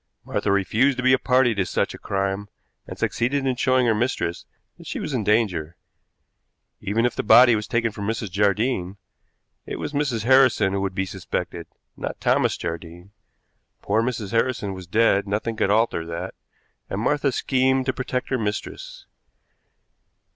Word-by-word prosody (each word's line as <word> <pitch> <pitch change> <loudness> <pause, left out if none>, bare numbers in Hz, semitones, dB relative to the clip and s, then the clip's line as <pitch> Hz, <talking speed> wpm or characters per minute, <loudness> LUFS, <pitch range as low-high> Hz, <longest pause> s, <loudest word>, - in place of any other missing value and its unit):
Martha 100 - -1
refused 110 +8 +2
to 125 - -2
be 130 0 +5
a - - +4
party 125 -2 +3
to 100 -3 0
such - - -1
a - - -10
crime, 100 +1 -2 0.4
and - - -8
succeeded 135 +4 0
in 130 -1 +1
showing 130 0 +2
her 115 - +3
mistress 110 -6 -2 0.3
that - - -12
she - - -4
was - - -4
in 120 -4 -1
danger. 95 -7 0 1.0
Even 115 +4 0
if 125 - 0
the - - -1
body 120 +2 +7
was 105 -1 -3
taken 115 -1 0
for 105 - -9
Mrs. 110 -1 -3
Jardine, 100 0 0 0.7
it - - -4
was - - -5
Mrs. 140 -7 -1
Harrison 130 -6 +4
who 100 - -1
would 95 -1 -3
be 95 - 0
suspected, 95 -1 -5 0.3
not - - -5
Thomas - - +2
Jardine. 85 +3 -7 0.7
Poor 110 +3 +1
Mrs. 115 -5 -3
Harrison 115 -4 0
was 95 -1 -9
dead, 100 0 +2
nothing 110 +3 -2
could 100 - 0
alter 110 -5 +2
that, 85 +3 -6 0.6
and 95 - -3
Martha 140 +4 +1
schemed 130 +1 +1
to 130 - 0
protect 125 0 -3
her 130 - 0
mistress. - - -5
110 Hz, 170 wpm, -23 LUFS, 100-130 Hz, 1.0 s, body